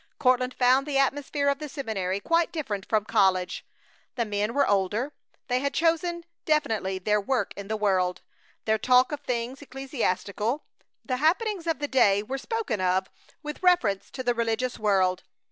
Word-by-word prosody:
Courtland 255 -1 +2
found 260 +3 +3
the 285 -2 0
atmosphere 280 +1 0
of 280 0 +2
the 300 -1 -6
seminary 200 -9 -2
quite 335 +8 +1
different 215 - -4
from 215 -2 +2
college. 190 -5 +1 0.5
The 235 - 0
men 210 +2 -2
were 280 - +3
older. 205 +8 0 0.3
They 250 0 +1
had 280 +1 -2
chosen 340 +1 +1 0.2
definitely 220 -11 0
their 210 +3 +1
work 255 +4 -1
in 200 -1 -7
the 220 +1 -2
world. 185 -3 +1 0.4
Their 220 0 +2
talk 250 +3 +4
was 295 - -3
of - - -34
things 245 +2 -2
ecclesiastical. 255 -3 -2 0.4
The 255 - -1
happenings 350 - +1
of 325 - +1
the 290 - -3
day 205 -7 +3
were 265 +5 -4
spoken 420 - -2
of 185 +1 +1 0.3
with 300 0 -6
reference 355 - +2
to 260 - -5
the 245 -1 +2
religious 235 +2 -1
world. 190 -4 +2
250 Hz, 170 wpm, -26 LUFS, 205-285 Hz, 0.5 s, talk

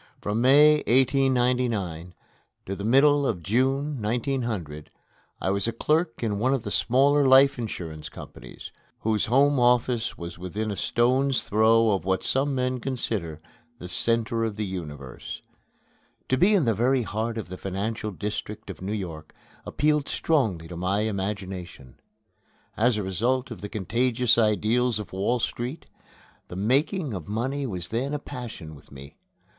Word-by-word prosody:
From 105 +3 -2
May, 145 +4 +6
1899, 125 - +1 0.5
till 95 - -4
the 100 - -7
middle 140 +5 +4
of 90 -7 -2
June, 135 - 0
1900, 110 - -3 0.5
I 95 - 0
was 100 +2 0
a - - +1
clerk 150 +1 0
in 105 -3 -1
one 130 +5 +2
of 125 - -4
the - - -5
smaller 140 +3 +3
life 135 0 +6
insurance 80 -9 -6
companies, - - -11 0.3
whose 110 0 0
home 140 +3 +3
office 120 -1 +2
was 85 0 -8
within 105 +4 -3
a - - -3
stone's 130 +5 +1
throw 110 +1 +4
of 95 -5 0
what 95 0 0
some 135 +1 0
men 130 0 -1
consider 105 - -3 0.4
the 90 - -8
center 115 +5 0
of 110 -2 -2
the 105 0 -3
universe. 75 -9 -7 0.9
To 130 - +3
be 190 +10 +4
in 175 -8 +3
the 115 - +3
very 125 +4 +2
heart 110 +2 -3
of 110 - -5
the 95 - -6
financial 105 +4 -3
district 105 +1 -5
of 90 - -12
New 100 +3 -3
York 85 -7 -6 0.3
appealed 150 -1 +1
strongly 110 - 0
to 85 - -8
my 95 +4 0
imagination. 95 - -5 0.8
As 115 +1 +2
a 105 - -2
result 120 +8 -1
of 115 - -8
the 105 - -6
contagious 120 +4 +1
ideals 115 +2 +2
of 105 -3 -7
Wall 100 +6 0
Street, 125 +6 -4 0.6
the - - -9
making 135 - 0
of 90 -6 -6
money 130 +6 -2
was 90 -5 -4
then 135 +6 -2
a - - 0
passion 120 - -8
with 70 - -16
me. 70 +1 -12
115 Hz, 155 wpm, -25 LUFS, 95-130 Hz, 0.9 s, May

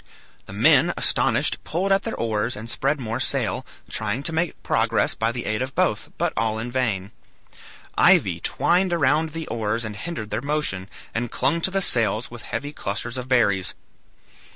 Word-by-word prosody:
The - - -9
men, - - +4
astonished, - - +2
pulled 185 +4 -1
at 195 0 +4
their 225 - -4
oars, 115 +1 -1
and 110 +2 -7
spread 140 +5 0
more 115 -1 -3
sail, 130 - 0 0.2
trying 110 +5 -2
to 165 - +1
make 165 +1 -2
progress 115 0 +1
by 115 +1 0
the 120 0 -5
aid 110 +2 -1
of 130 +1 -4
both, - - +1
but - - 0
all 110 -1 0
in 115 +2 -4
vain. 110 -7 -1 0.8
Ivy - - +4
twined 175 -1 +1
round 150 +3 +3
the 165 -1 -4
oars 115 0 -1
and 105 -1 -5
hindered 110 -2 -5
their - - -1
motion, 140 -10 -1 0.2
and 120 +1 -2
clung 170 - +1
to 190 - +3
the 195 0 +1
sails, 115 -2 +2
with 120 -2 -9
heavy 145 +8 -4
clusters 115 +1 -4
of 125 -1 -5
berries. 100 -7 +2
120 Hz, 175 wpm, -23 LUFS, 110-150 Hz, 0.8 s, men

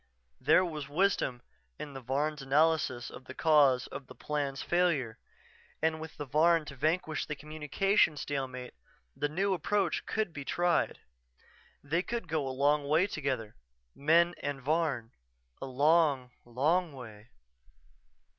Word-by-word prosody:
_" - - -41 0.4
There 185 - +6
was 150 -5 -5
wisdom 145 -7 +1 0.3
in 145 - -7
the 135 - -7
Varn's 145 +4 -1
analysis 140 -3 +1
of 130 - -11
the 130 - -9
cause 145 -6 +4
of 135 - -8
the - - -12
Plan's 145 -2 -3
failure 150 -10 +1 0.6
and 160 0 0
with 160 -1 -9
the 145 - -4
Varn 160 +3 +3
to 140 - -9
vanquish 155 +3 -1
the 150 - -3
communication 155 +4 +1
stalemate, 130 -4 -4 0.4
the 145 - -1
new 190 +5 0
approach 185 0 0
could 215 -6 -1
be 145 - -6
tried. 175 +4 0 0.8
They 160 +5 0
could 230 0 -4
go 155 -3 -1
a - - -2
long 140 +2 +1
way 155 +5 +4
together, 135 - -3 0.4
men 170 +4 +3
and 145 -1 -3
Varn, 140 -5 -1 0.5
a - - -4
long, 140 -1 +3
long 150 +8 +1
way.... 110 -4 -11
150 Hz, 145 wpm, -31 LUFS, 135-165 Hz, 0.8 s, There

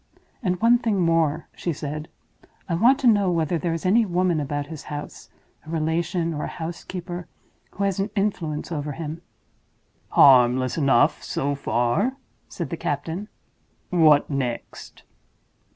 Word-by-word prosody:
"And 180 -5 -1
one 235 +1 +5
thing 225 -5 0
more," 165 -2 +1
she 175 - -2
said; 150 0 -5 0.6
"I 175 - -2
want 235 +10 +5
to 255 - +3
know 205 -4 +4
whether 165 0 0
there 170 +2 -1
is 165 - -6
any 220 +6 +4
woman 180 -4 +1
about 145 0 -2
his 155 0 -9
house—a 150 +1 -10
relation, 165 +1 -1
or 150 - -4
a - - -8
housekeeper—who 175 +3 -7
has 195 -1 0
an 195 +2 0
influence 175 -7 -2
over 150 -2 -3
him." 160 +2 -6 0.9
"Harmless 130 -1 +5
enough, 145 0 +3
so 145 +1 -2
far," 140 - 0 0.3
said 170 -6 -5
the 170 - -3
captain. 165 +10 -3 0.6
"What 155 -5 +5
next?" 130 -4 -5
165 Hz, 135 wpm, -24 LUFS, 145-185 Hz, 0.9 s, one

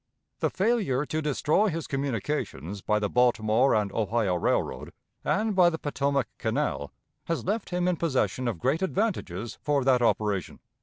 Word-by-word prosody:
The - - +1
failure 190 - +1
to 155 +1 -2
destroy 150 +7 +2
his 165 -4 -2
communications 115 - -3
by 105 +2 +1
the 105 -1 0
Baltimore 120 +1 +3
and 105 -2 0
Ohio 110 -2 0
Railroad 85 - -1 0.3
and 215 0 0
by 180 -2 +6
the 160 - -3
Potomac 140 -3 0
Canal 70 - -1 0.3
has 165 - -2
left 210 +3 -1
him 180 0 0
in 180 -2 +1
possession 130 -5 0
of 115 -6 -1
great 135 - 0
advantages 180 - -2
for 145 -2 +1
that 130 -1 +3
operation. 105 -6 0
135 Hz, 155 wpm, -27 LUFS, 110-165 Hz, 0.3 s, by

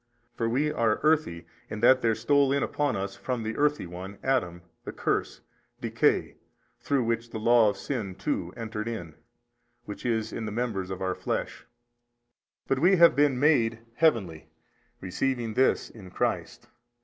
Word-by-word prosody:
For 115 -1 -1
we 145 +6 +1
are 115 -7 +1
earthy, 150 - +1 0.2
in 105 - -5
that 130 +2 +6
there 115 -1 +2
stole 140 +4 +2
in 140 0 +1
upon 145 -2 -1
us 100 0 -3
as - - -24
from 125 -3 -2
the 110 +1 -3
earthy 150 -4 +1
one, 90 +3 -8
Adam, 90 -11 0 0.2
the - - -6
curse, - - -2 0.4
decay, - - +1 0.4
through 140 -3 0
which 115 0 -2
the 110 - -6
law 115 0 +5
of 100 - -4
sin 105 -6 -4
too - - -3
entered 110 -1 -5
in, 90 -9 -5 0.7
which 105 - -8
is 110 -3 -1
in 110 - -4
the - - -4
members 105 -5 -2
of 95 0 -5
our 95 0 0
flesh: - - -4 1.0
but 135 - +1
we 180 +6 +5
have 170 -1 +6
been 145 -3 +3
MADE 120 -6 +3 0.2
heavenly, 105 - +1 0.5
receiving 115 +5 -2
this 130 +4 +2
in 100 -5 -12
Christ. - - -3
115 Hz, 165 wpm, -27 LUFS, 100-135 Hz, 1.0 s, that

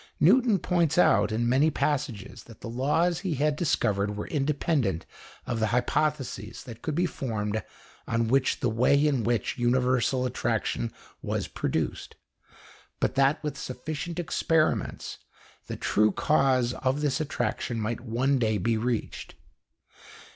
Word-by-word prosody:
Newton 225 - +5
points 170 -4 +1
out, 105 - +4
in 115 +2 0
many 135 +6 +4
passages, 140 -8 -2
that 115 -2 -15
the - - -6
laws 150 +8 +1
he 185 -6 -2
had 150 +2 +1
discovered 105 - 0
were 105 - -4
independent 140 - 0 0.4
of 120 - -2
the 110 - +2
hypotheses 125 -2 -1
that 115 -3 -10
could 155 - -3
be 175 +2 +2
formed 110 -9 -2 0.5
on 115 0 +1
the 130 0 +2
way 130 +6 +3
in 140 -6 +1
which 120 +1 -1
universal 125 +1 +2
attraction 120 -1 -1 0.3
was - - -2
produced, - - -3 0.8
but - - +1
that 140 +3 +2
with 150 -2 -3
sufficient 155 +6 -5
experiments 165 -2 0 0.5
the - - -4
true 105 0 +2
cause 130 -2 +2
of 130 +3 -1
this 145 -1 0
attraction 125 -5 -2
might 110 +2 -2
one 125 +3 +1
day 110 -3 +1
be 110 +4 0
reached. 115 0 -3
130 Hz, 135 wpm, -27 LUFS, 115-150 Hz, 0.8 s, Newton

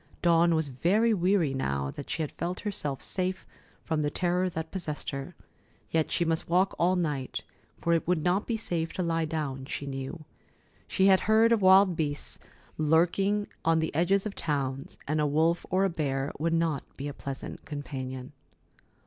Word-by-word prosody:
Dawn 170 0 +5
was 160 -2 0
very 200 - +2
weary 180 -6 +2
now 70 - -1
that 145 - -8
she 160 - -1
felt 170 +4 -4
herself 150 -10 -2
safe 185 0 -2 0.4
from 160 -2 -1
the 145 - +1
terror 180 +3 0
that 160 -2 -5
possessed 160 -6 -4
her, 140 +5 -6 0.6
yet 160 -1 +1
she 170 - +1
must 165 0 -1
walk 185 +3 +3
all 180 +2 +3
night, 150 -7 -2 0.4
for 170 - +1
it 165 - +1
would 175 -3 +1
not 180 +4 +1
be 230 - 0
safe 170 -6 -1
to 185 - -2
lie 165 -1 0
down, 145 -4 -3
she 140 - -5
knew. 135 +4 -6 0.6
She 190 - +2
had 190 -1 +6
heard 225 +1 +5
of 230 -3 +3
wild 190 -1 +6
beasts 145 -2 -3 0.4
lurking 175 +7 +2 0.2
on 165 0 +3
the 160 0 -1
edges 190 +6 +2
of 210 - -3
towns, 140 -5 -3
and 155 +1 +1
a 150 - +2
wolf 160 +4 +1
or 190 +2 +3
a - - +2
bear 140 -4 -1
would 165 +2 +1
not 165 -4 0
be 140 - -4
a 145 - -5
pleasant 135 -1 -7
companion. 130 -2 -6
165 Hz, 180 wpm, -28 LUFS, 145-185 Hz, 0.6 s, had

